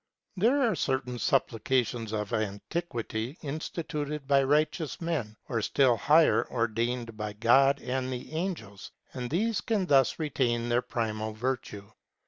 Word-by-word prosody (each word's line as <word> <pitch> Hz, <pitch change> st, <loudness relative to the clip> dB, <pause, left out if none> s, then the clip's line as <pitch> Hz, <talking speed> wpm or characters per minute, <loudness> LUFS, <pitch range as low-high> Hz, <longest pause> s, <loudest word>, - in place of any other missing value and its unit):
There 245 Hz, +9 st, +3 dB
are 230 Hz, -3 st, +3 dB
certain 125 Hz, -6 st, -1 dB
supplications 120 Hz, -3 st, 0 dB
of 105 Hz, -2 st, -3 dB
antiquity, 115 Hz, -, -3 dB
instituted 150 Hz, -1 st, -4 dB
by 140 Hz, -1 st, +5 dB
righteous 150 Hz, +3 st, +1 dB
men, 150 Hz, -11 st, -3 dB
or 115 Hz, -3 st, -1 dB
still 130 Hz, +2 st, +3 dB
higher, 155 Hz, +8 st, +4 dB
ordained 115 Hz, 0 st, -1 dB
by 105 Hz, -1 st, -4 dB
God 135 Hz, +6 st, +4 dB
and 130 Hz, +1 st, -2 dB
the 125 Hz, +4 st, -6 dB
angels; 155 Hz, -, -4 dB, 0.2 s
and 125 Hz, -2 st, -4 dB
these 215 Hz, +7 st, 0 dB
can 210 Hz, -5 st, 0 dB
thus 135 Hz, -6 st, +4 dB
retain 120 Hz, -6 st, 0 dB
their 120 Hz, +1 st, +3 dB
primal 110 Hz, -3 st, -3 dB
virtue. 110 Hz, -3 st, -4 dB
130 Hz, 130 wpm, -29 LUFS, 115-150 Hz, 0.2 s, by